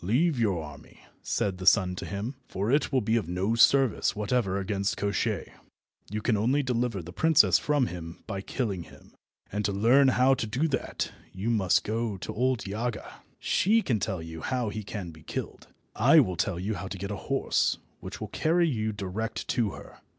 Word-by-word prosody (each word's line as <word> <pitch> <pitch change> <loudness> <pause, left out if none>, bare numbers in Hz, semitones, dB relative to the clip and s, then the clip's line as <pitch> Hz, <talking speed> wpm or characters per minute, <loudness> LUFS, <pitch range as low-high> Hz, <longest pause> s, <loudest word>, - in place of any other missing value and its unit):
"Leave 130 - +2
your 95 -8 +1
army," 75 -2 -12 0.2
said 95 -2 -1
the 95 - -6
sun 95 -4 +5
to - - -6
him, 100 +6 -4
"for 100 +5 -2
it 145 0 +2
will 130 -2 +2
be 110 +2 +1
of 100 -7 -2
no 95 +5 0
service 130 +1 +4
whatever 105 -2 0
against 100 0 -1
Koshchei. 100 0 -1 0.6
You 105 +1 -4
can 120 - +2
only 125 +8 +2
deliver 120 -6 -1
the 85 +2 -10
princess 135 - +5
from 145 -3 +1
him 85 -4 -8
by 100 -3 -4
killing 100 -4 -3
him, - - -17 0.4
and 105 +1 -2
to 100 - +1
learn 120 +8 +5
how 130 0 +4
you - - +7
are - - +5
to 110 - -2
do 130 +9 0
that 135 - -2 0.2
you 100 +5 -2
must 100 -6 +2
go 110 -1 -2
to - - -6
old 125 +1 0
Yaga. 110 +3 -4 0.2
She 220 +4 +2
can 115 -5 0
tell 95 -5 -3
you 80 0 -8
how 125 0 -1
he 110 +1 -4
can 100 -4 -6
be 80 -1 -15
killed. - - -6 0.3
I - - +6
will 90 - +2
tell 85 +1 -1
you 100 +4 -2
how 100 - -5
to 95 - -6
get 100 +2 -5
a - - -2
horse 135 -1 +1 0.2
which - - -8
will - - -5
carry 170 +2 +2
you 110 -7 -1
direct 105 +2 -4
to 120 -4 +1
her. - - -12
105 Hz, 205 wpm, -28 LUFS, 95-125 Hz, 0.6 s, you